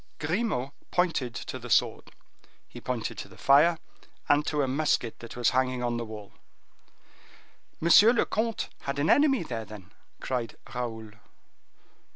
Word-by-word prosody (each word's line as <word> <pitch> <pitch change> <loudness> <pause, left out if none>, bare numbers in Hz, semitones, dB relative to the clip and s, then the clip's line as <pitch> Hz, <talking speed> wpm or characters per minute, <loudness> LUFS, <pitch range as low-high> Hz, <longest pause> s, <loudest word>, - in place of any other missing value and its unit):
Grimaud 160 - -1 0.2
pointed 160 -10 0
to - - -6
the - - -9
sword; - - +1 0.6
he - - -11
pointed 125 -3 -3
to - - -6
the 95 - -17
fire 150 +5 +5 0.5
and 145 +1 +4
to 150 -2 +1
a - - 0
musket 130 -4 0
that 115 - -10
was 120 -1 +2
hanging 130 -1 0
on 120 -1 -1
the 120 - -3
wall. 105 -2 -10 1.5
"Monsieur 185 +7 +7
le 240 - +2
comte 225 0 -2
had 140 0 -4
an 145 +2 +2
enemy 280 - +4
there, 115 -7 -5
then?" 105 -3 -12 0.3
cried 125 -3 -3 0.2
Raoul. 110 -3 -5
130 Hz, 150 wpm, -28 LUFS, 115-165 Hz, 1.5 s, Monsieur